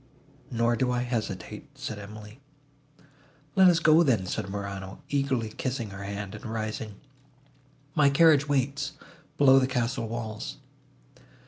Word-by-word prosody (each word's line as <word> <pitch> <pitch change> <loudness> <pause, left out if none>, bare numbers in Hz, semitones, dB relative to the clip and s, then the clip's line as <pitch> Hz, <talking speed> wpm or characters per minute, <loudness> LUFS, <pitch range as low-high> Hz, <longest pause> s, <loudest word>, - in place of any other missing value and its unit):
"Nor 120 0 +1
do 125 +1 +1
I 125 0 0
hesitate," 110 -6 -4
said 110 - -5
Emily. 105 +3 -10 1.2
"Let 190 -1 +7
us 175 -2 +6
go, 165 0 +6
then," 120 - +2
said 100 +2 -3
Morano, 100 -1 -6
eagerly 135 -5 0
kissing 120 -2 -4
her 95 0 -8
hand, 100 0 -5
and 105 - -9
rising, 110 -1 -4 1.0
"my 150 -3 +5
carriage 150 0 +5
waits, 140 0 0 0.4
below 135 -1 +7
the 130 - +1
castle 120 -2 -1
walls." 110 - -5
115 Hz, 130 wpm, -27 LUFS, 105-135 Hz, 1.2 s, Let